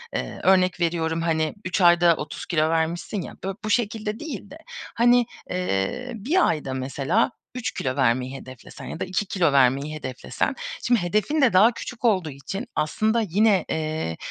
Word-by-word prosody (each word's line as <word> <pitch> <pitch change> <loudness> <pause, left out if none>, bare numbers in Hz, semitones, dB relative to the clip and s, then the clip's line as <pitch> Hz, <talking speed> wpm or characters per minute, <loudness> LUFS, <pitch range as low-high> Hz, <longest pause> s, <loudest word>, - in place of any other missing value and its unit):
eee, - - -4
örnek 185 -1 +3
veriyorum, 165 -1 0
hani, 160 -2 0
3 185 +2 -1
ayda 175 -1 +6
30 150 0 -6
kilo 155 -2 +1
vermişsin 165 +5 -1
ya, - - -8
bı 195 0 -3
bu - - -2
şekilde 215 -1 -1
değil 280 -10 -7
de. 305 - -9 0.4
Hani, 240 +1 +5 0.2
eee, 180 - -2
1 295 - +2
ayda 145 -4 -2
mesela 140 - 0 0.2
3 255 - -2
kilo 130 -1 -3
vermeyi 130 0 +1
hedeflesen 130 -2 -11
ya - - -7
da - - -2
2 185 +3 -1
kilo 180 -5 +1
vermeyi 140 +3 +3
hedeflesen, 130 -4 -3 0.3
şimdi 240 -2 +3
hedefin 215 - 0
de 260 -4 +4
daha 215 +6 +6
küçük 245 +1 -7
olduğu 185 -8 +2
için 195 - -6
aslında 220 +9 +1
yine, 205 0 +2
eee, 155 - -2
175 Hz, 170 wpm, -24 LUFS, 155-215 Hz, 0.4 s, ayda